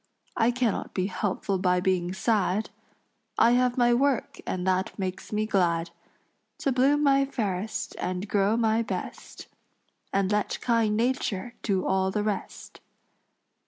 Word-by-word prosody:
I 225 Hz, 0 st, +3 dB
cannot 245 Hz, -3 st, -1 dB
be 185 Hz, -, +1 dB
helpful 195 Hz, -1 st, -2 dB
by 180 Hz, -1 st, +2 dB
being 180 Hz, -1 st, 0 dB
sad; 205 Hz, 0 st, 0 dB, 0.7 s
I 235 Hz, -, +5 dB
have 250 Hz, 0 st, +2 dB
my 240 Hz, -1 st, +4 dB
work 270 Hz, 0 st, 0 dB
and 180 Hz, -1 st, -2 dB
that 190 Hz, +3 st, 0 dB
makes 190 Hz, -1 st, -4 dB
me 215 Hz, 0 st, 0 dB
glad 170 Hz, -5 st, +1 dB, 0.7 s
To 275 Hz, -, +1 dB
bloom 275 Hz, +4 st, +3 dB
my 275 Hz, -1 st, +4 dB
fairest 220 Hz, -7 st, -3 dB
and 185 Hz, +2 st, -3 dB
grow 200 Hz, +2 st, +2 dB
my 225 Hz, -1 st, +2 dB
best, 230 Hz, -, -6 dB, 0.7 s
And 195 Hz, 0 st, +1 dB
let 210 Hz, 0 st, 0 dB
kind 225 Hz, -3 st, +1 dB
nature 240 Hz, -2 st, -1 dB
do 195 Hz, -4 st, 0 dB
all 190 Hz, 0 st, +1 dB
the 205 Hz, +2 st, -1 dB
rest." 210 Hz, -2 st, -5 dB
210 Hz, 140 wpm, -27 LUFS, 190-240 Hz, 0.7 s, I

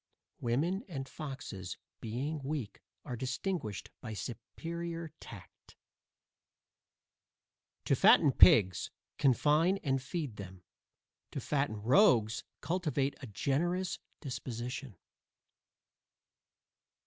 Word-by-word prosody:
Women, 160 Hz, -, 0 dB
and 135 Hz, -7 st, -5 dB
foxes, 130 Hz, -, -6 dB, 0.2 s
being 140 Hz, +7 st, -3 dB
weak, 135 Hz, -6 st, -4 dB, 0.2 s
are 125 Hz, -, -4 dB
distinguished 130 Hz, -, -3 dB
by 110 Hz, -3 st, -5 dB
superior 165 Hz, +8 st, -5 dB
tact. 100 Hz, -7 st, -13 dB, 2.1 s
To -, -, +3 dB
fatten -, -, +7 dB
pigs, 95 Hz, -2 st, +6 dB, 0.3 s
confine 150 Hz, +7 st, +4 dB
and 135 Hz, -2 st, +1 dB
feed 135 Hz, -, -4 dB
them; 95 Hz, -2 st, -9 dB, 0.7 s
to -, -, -4 dB
fatten 135 Hz, -8 st, -1 dB
rogues, 115 Hz, -, +5 dB, 0.2 s
cultivate 150 Hz, -6 st, 0 dB
a 130 Hz, -, -6 dB
generous 170 Hz, -, 0 dB, 0.2 s
disposition. 125 Hz, -3 st, -5 dB
135 Hz, 85 wpm, -33 LUFS, 115-160 Hz, 2.1 s, fatten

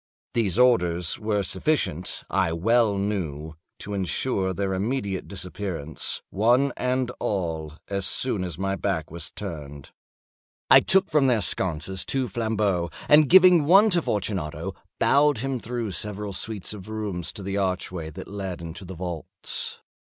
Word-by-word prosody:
These 110 Hz, -6 st, +1 dB
orders 90 Hz, -9 st, +3 dB
were 105 Hz, -2 st, 0 dB
sufficient, 95 Hz, -, -1 dB
I 95 Hz, -4 st, +1 dB
well 110 Hz, +4 st, +2 dB
knew, 80 Hz, -7 st, -3 dB, 0.2 s
to 105 Hz, -, -7 dB
insure 95 Hz, +1 st, 0 dB
their 95 Hz, +1 st, -2 dB
immediate 100 Hz, -1 st, -2 dB
disappearance, 90 Hz, -5 st, -4 dB
one 120 Hz, +7 st, +3 dB
and 125 Hz, 0 st, 0 dB
all, 80 Hz, -6 st, -2 dB
as 100 Hz, -1 st, -1 dB
soon 115 Hz, -7 st, 0 dB
as 85 Hz, -4 st, -5 dB
my 95 Hz, +1 st, -1 dB
back 90 Hz, -6 st, -2 dB
was 85 Hz, -1 st, -4 dB
turned. 75 Hz, -8 st, -8 dB, 0.8 s
I -, -, +11 dB
took 190 Hz, 0 st, +3 dB
from 150 Hz, -3 st, +4 dB
their 120 Hz, -3 st, +3 dB
sconces 90 Hz, +1 st, 0 dB
two 135 Hz, -2 st, -1 dB
flambeaux, 105 Hz, -5 st, 0 dB, 0.2 s
and 150 Hz, -1 st, +6 dB
giving 180 Hz, -3 st, +7 dB
one 200 Hz, +7 st, +6 dB
to 175 Hz, -2 st, +3 dB
Fortunato, 95 Hz, -, -2 dB, 0.3 s
bowed 145 Hz, -1 st, +4 dB
him 135 Hz, +2 st, -2 dB
through 115 Hz, -2 st, -4 dB
several 105 Hz, +1 st, -4 dB
suites 105 Hz, +1 st, -3 dB
of 105 Hz, -1 st, -10 dB
rooms 105 Hz, -6 st, -3 dB
to 105 Hz, -, -8 dB
the 100 Hz, +1 st, -2 dB
archway 90 Hz, -4 st, -2 dB
that 80 Hz, -, -9 dB
led 95 Hz, -3 st, -5 dB
into 85 Hz, +3 st, -8 dB
the 95 Hz, 0 st, -8 dB
vaults. 85 Hz, -2 st, -4 dB
100 Hz, 145 wpm, -25 LUFS, 90-120 Hz, 0.8 s, I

